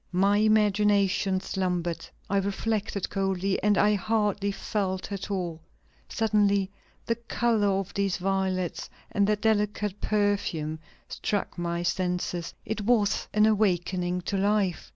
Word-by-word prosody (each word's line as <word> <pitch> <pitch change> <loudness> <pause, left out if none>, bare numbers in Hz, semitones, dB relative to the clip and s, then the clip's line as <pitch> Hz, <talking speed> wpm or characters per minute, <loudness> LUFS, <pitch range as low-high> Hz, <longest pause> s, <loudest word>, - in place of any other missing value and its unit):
My 195 +3 +3
imagination 205 -3 +3
slumbered, 180 -3 -2 0.2
I 200 - 0
reflected 200 0 -1
coldly, 195 -1 0
and 205 -1 +3
I 210 0 +4
hardly 205 0 0
felt 195 -1 -3
at 195 0 -4
all; 175 -5 -3 0.5
suddenly 205 -3 +2 0.3
the 230 - +1
color 230 -2 0
of 195 0 -6
these 200 -2 0
violets 190 -1 -1 0.2
and 200 -1 +2
their 210 - +3
delicate 210 -1 0
perfume 200 -7 0 0.3
struck 205 -2 -2
my 170 0 -2
senses; 180 -1 -2
it 220 0 -3
was 210 -1 +2
an 210 0 +4
awakening 180 -4 +1
to 195 +3 -2
life.... 200 -2 0
200 Hz, 125 wpm, -27 LUFS, 185-210 Hz, 0.5 s, I